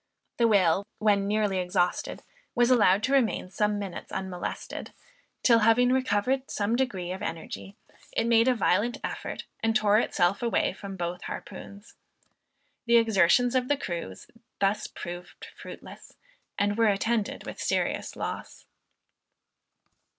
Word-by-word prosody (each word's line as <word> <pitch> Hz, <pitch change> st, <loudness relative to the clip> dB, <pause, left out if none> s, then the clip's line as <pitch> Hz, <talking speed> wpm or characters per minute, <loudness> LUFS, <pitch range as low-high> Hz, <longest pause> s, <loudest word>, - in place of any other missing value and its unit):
The 235 Hz, -, +4 dB
whale 195 Hz, -2 st, +3 dB
when 205 Hz, -2 st, +2 dB
nearly 205 Hz, -2 st, +1 dB
exhausted 180 Hz, 0 st, -1 dB, 0.3 s
was 240 Hz, 0 st, +4 dB
allowed 210 Hz, -4 st, +4 dB
to 265 Hz, -, +1 dB
remain 230 Hz, -8 st, +1 dB
some 210 Hz, +1 st, 0 dB
minutes 195 Hz, -3 st, -6 dB
unmolested, 190 Hz, -2 st, -5 dB, 0.5 s
till 230 Hz, -2 st, +6 dB
having 230 Hz, +3 st, +4 dB
recovered 260 Hz, +1 st, +1 dB
some 210 Hz, +2 st, 0 dB
degree 195 Hz, -9 st, -1 dB
of 185 Hz, -, -5 dB
energy, 165 Hz, +4 st, -6 dB, 0.4 s
it 225 Hz, -, +2 dB
made 230 Hz, 0 st, +4 dB
a 255 Hz, -, +4 dB
violent 215 Hz, +3 st, +1 dB
effort -, -, -5 dB, 0.2 s
and 225 Hz, 0 st, +1 dB
tore 215 Hz, 0 st, +4 dB
itself 185 Hz, -3 st, +1 dB
away 235 Hz, -2 st, +1 dB
from 195 Hz, -1 st, -8 dB
both 175 Hz, 0 st, -3 dB
harpoons. 200 Hz, +2 st, -9 dB, 0.9 s
The 235 Hz, 0 st, +6 dB
exertions 225 Hz, +2 st, +4 dB
of 255 Hz, -1 st, +1 dB
the 290 Hz, -, +2 dB
crews 170 Hz, -, -5 dB, 0.3 s
thus 200 Hz, +2 st, +1 dB
proved 175 Hz, +1 st, -8 dB
fruitless, -, -, -11 dB, 0.4 s
and 205 Hz, +2 st, 0 dB
were 225 Hz, -, +5 dB
attended 215 Hz, +2 st, 0 dB
with -, -, -7 dB
serious -, -, -1 dB
loss. -, -, -6 dB
210 Hz, 135 wpm, -27 LUFS, 190-235 Hz, 0.9 s, till